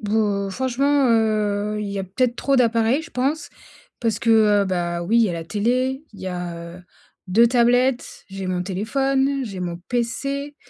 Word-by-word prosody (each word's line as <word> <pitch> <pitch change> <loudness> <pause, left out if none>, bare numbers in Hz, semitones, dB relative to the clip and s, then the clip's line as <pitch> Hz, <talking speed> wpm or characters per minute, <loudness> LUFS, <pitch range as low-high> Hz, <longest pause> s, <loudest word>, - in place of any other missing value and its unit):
Boh, 205 -2 0
franchement, 265 +4 +1
heu, 210 -2 +1
il 210 - -3
y 200 0 -4
a 190 - -2
peut-être 240 +6 0
trop 275 +2 0
d'appareils, 235 +4 +2
je 335 - -12
pense. 275 +5 -1 0.5
Parce 225 -3 0
que, 215 -3 +4
heu, - - 0
bah, 175 -2 -2
oui, 225 +7 +2
il - - +5
y 220 - +2
a - - -2
la 165 -1 -5
télé, 255 - -1
il 200 - -13
y 190 - -6
a, 175 -1 -6
heu, 180 - -14 0.5
2 230 +6 +5
tablettes, 245 +1 +1
j'ai 195 -1 -6
mon 180 -1 -1
téléphone, 270 +8 0
j'ai 195 -4 -6
mon 175 -1 -3
PC. 275 +4 -2
225 Hz, 185 wpm, -22 LUFS, 195-255 Hz, 0.5 s, il